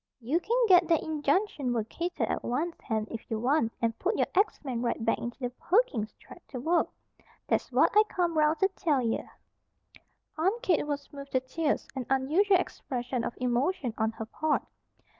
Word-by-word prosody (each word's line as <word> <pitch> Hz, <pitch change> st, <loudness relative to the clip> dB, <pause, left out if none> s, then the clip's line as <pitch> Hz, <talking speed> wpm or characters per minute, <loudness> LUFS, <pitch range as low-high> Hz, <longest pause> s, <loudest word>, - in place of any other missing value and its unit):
"You 265 Hz, +8 st, 0 dB
can 460 Hz, +7 st, 0 dB
git 360 Hz, -3 st, +6 dB
that 330 Hz, -2 st, +3 dB
injunction 300 Hz, -2 st, 0 dB
vacated 245 Hz, +11 st, -2 dB
at -, -, -2 dB
once, 310 Hz, +8 st, -1 dB
Hen, 220 Hz, -3 st, -1 dB
if 230 Hz, -, -7 dB
you 225 Hz, -, -1 dB
want, 245 Hz, -1 st, +2 dB
and 230 Hz, -1 st, -1 dB
put -, -, 0 dB
your -, -, +3 dB
axe 405 Hz, +4 st, +2 dB
men 245 Hz, -3 st, -2 dB
right 235 Hz, -2 st, -1 dB
back 225 Hz, -, +2 dB
into 240 Hz, 0 st, -5 dB
the 245 Hz, -2 st, -3 dB
Perkins 270 Hz, -, +1 dB
Tract 345 Hz, -, -16 dB
to 255 Hz, -, -5 dB
work. 330 Hz, +7 st, +2 dB, 0.6 s
That's -, -, 0 dB
what -, -, +4 dB
I 425 Hz, -, +9 dB
come 345 Hz, -2 st, 0 dB
'round 305 Hz, +1 st, +3 dB
to 385 Hz, -, +6 dB
tell 300 Hz, -8 st, 0 dB
ye." 225 Hz, -1 st, 0 dB, 1.2 s
Aunt 395 Hz, +9 st, +1 dB
Kate 345 Hz, -8 st, +2 dB
was 285 Hz, 0 st, -4 dB
moved 280 Hz, -1 st, -9 dB
to 260 Hz, -, +4 dB
tears, 285 Hz, +4 st, -1 dB
an 260 Hz, -3 st, -4 dB
unusual 315 Hz, +10 st, +3 dB
expression 250 Hz, -8 st, -3 dB
of -, -, -3 dB
emotion 250 Hz, +2 st, 0 dB
on 220 Hz, 0 st, 0 dB
her 225 Hz, -, -6 dB
part. 310 Hz, +7 st, 0 dB
280 Hz, 185 wpm, -29 LUFS, 240-345 Hz, 1.2 s, I